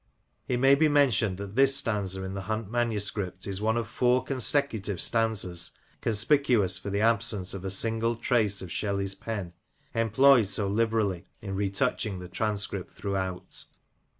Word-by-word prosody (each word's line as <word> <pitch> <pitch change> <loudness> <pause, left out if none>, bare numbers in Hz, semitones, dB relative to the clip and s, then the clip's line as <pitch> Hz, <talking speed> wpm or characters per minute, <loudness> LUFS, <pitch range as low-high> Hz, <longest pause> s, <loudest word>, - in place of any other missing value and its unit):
It 125 - 0
may 135 +2 +5
be 155 +3 +4
mentioned 120 -10 +3
that 100 +1 -7
this 135 +1 +5
stanza 100 -6 -2
in 95 0 -5
the 100 - -4
Hunt 110 -1 -3
manuscript 105 -5 -2
is 100 0 -4
one 110 +1 +1
of 115 - -2
four 125 0 +2
consecutive 125 - +1
stanzas, 110 -6 0 0.3
conspicuous 115 -3 +2
for 95 +1 -3
the 100 +1 -1
absence 110 -4 +1
of 95 -2 -7
a 95 - -3
single 115 +4 +1
trace 110 -4 +1
of 90 - -8
Shelley's 100 +1 -1
pen, 100 -5 -5 0.4
employed 115 +1 +4
so 100 0 -2
liberally 105 -3 0
in 100 -2 -6
retouching 100 +1 0
the 90 0 -8
transcript 105 +1 -2
throughout. 95 -2 -4
105 Hz, 150 wpm, -27 LUFS, 95-115 Hz, 0.4 s, may